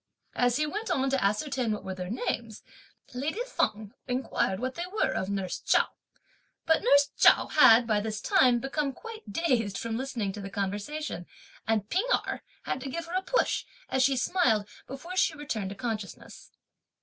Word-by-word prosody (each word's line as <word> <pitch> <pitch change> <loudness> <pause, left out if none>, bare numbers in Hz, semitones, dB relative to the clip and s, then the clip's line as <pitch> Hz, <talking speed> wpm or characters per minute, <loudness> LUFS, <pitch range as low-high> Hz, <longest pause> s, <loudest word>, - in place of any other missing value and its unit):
As 245 -1 +2
he 305 +3 +1
went 415 +9 -4
on 270 0 +1
to 270 -4 +1
ascertain 235 +4 0
what 210 - -3
were 190 - -4
their 180 -1 -6
names, 230 -1 -3 0.5
lady 300 - -2
Feng 215 - -1
inquired 250 -6 -1
what 255 +2 -2
they 345 +4 -4
were 430 - +1
of 190 - -2
nurse 195 -2 -2
Chao. - - +3 0.8
But 320 0 +3
nurse 285 0 +4
Chao - - +6
had, 240 -6 +6
by 215 -2 +2
this 215 0 -3
time, 250 -2 +4
become 275 +3 -2
quite 440 - -10
dazed 230 - 0
from 225 -1 -3
listening 245 -6 -2
to 205 - -7
the 195 - -6
conversation, 205 - -4 0.4
and 220 -2 +1
P'ing 375 - 0 0.2
Erh - - -4 0.2
had 255 - -3
to 270 - -5
give 335 +5 -4
her 335 - -9
a 370 - +1
push, - - 0 0.2
as 265 - +1
she 265 0 +3
smiled, 245 - +2 0.2
before 335 +8 -7
she 335 -3 +2
returned 230 -10 -3
to 200 - -7
consciousness. 220 -2 -6
250 Hz, 180 wpm, -28 LUFS, 210-295 Hz, 0.8 s, Chao